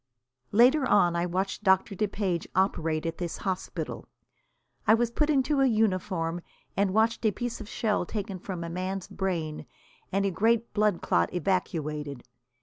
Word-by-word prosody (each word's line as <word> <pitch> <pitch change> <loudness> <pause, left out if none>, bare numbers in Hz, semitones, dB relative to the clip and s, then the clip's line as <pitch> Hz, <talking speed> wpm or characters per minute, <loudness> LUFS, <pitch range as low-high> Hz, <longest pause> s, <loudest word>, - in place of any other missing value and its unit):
Later 255 +7 +5
on 175 -1 +4
I 170 +1 0
watched 190 +4 -2
Doctor 190 0 +3
DePage 195 -3 -1
operate 165 -4 +1
at 165 0 -3
this 175 -2 -3
hospital. 190 -1 -4 0.8
I 220 - +7
was 235 0 0
put 300 +5 +1
into 280 0 +2
a 270 - +5
uniform, 185 -6 0 0.3
and 200 -1 +2
watched 225 +2 +2
a 220 - +4
piece 240 +2 -4
of 215 - -9
shell 210 -7 0
taken 200 -3 -4
from 180 -2 -5
a - - -4
man's 185 +2 -3
brain 160 -6 -3 0.4
and 195 +1 +1
a 195 - +1
great 230 +5 +1
blood 210 -4 +1
clot 85 0 +2
evacuated. 150 -6 -2
190 Hz, 155 wpm, -28 LUFS, 170-220 Hz, 0.8 s, I